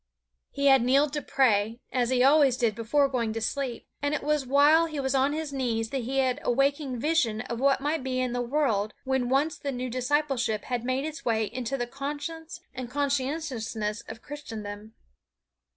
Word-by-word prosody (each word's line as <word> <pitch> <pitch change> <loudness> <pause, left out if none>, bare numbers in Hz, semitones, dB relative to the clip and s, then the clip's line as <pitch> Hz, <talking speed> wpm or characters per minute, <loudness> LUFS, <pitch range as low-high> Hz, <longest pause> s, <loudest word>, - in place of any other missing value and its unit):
He 280 - -3
had 270 -2 +7
kneeled 275 +4 +3
to 295 - -1
pray, 230 -4 +2
as 245 -2 +1
he 255 -1 +3
always 275 -2 +5
did 230 -3 +1
before 235 +6 +2
going 235 -5 -1
to 225 - -3
sleep, 250 +2 -3 0.2
and 285 +1 0
it - - -4
was 300 -2 0
while 295 +5 +5
he 305 -3 -5
was 265 -1 -1
on 270 +1 +3
his 305 -1 -4
knees 230 -4 -1
that 270 - -1
he 270 +3 -2
had 260 -2 +2
a - - 0
waking 275 +1 +1
vision 245 -7 +1
of 235 -1 -5
what 270 0 +3
might 295 0 -1
be 255 -1 -1
in 255 -1 -1
the 245 - -1
world 235 -6 0
when 265 -2 0
once 285 +4 +1
the 280 - -3
new 250 -1 -4
discipleship 255 -4 0
had 245 -2 -3
made 255 +3 -1
its 315 0 -6
way 220 -2 +1
into 255 +4 -3
the 240 - -1
conscience 295 +6 -6
and 255 -2 -6
conscientiousness 265 -6 -2
of 225 +1 -9
Christendom. 220 -7 -8
265 Hz, 195 wpm, -27 LUFS, 235-285 Hz, 0.2 s, had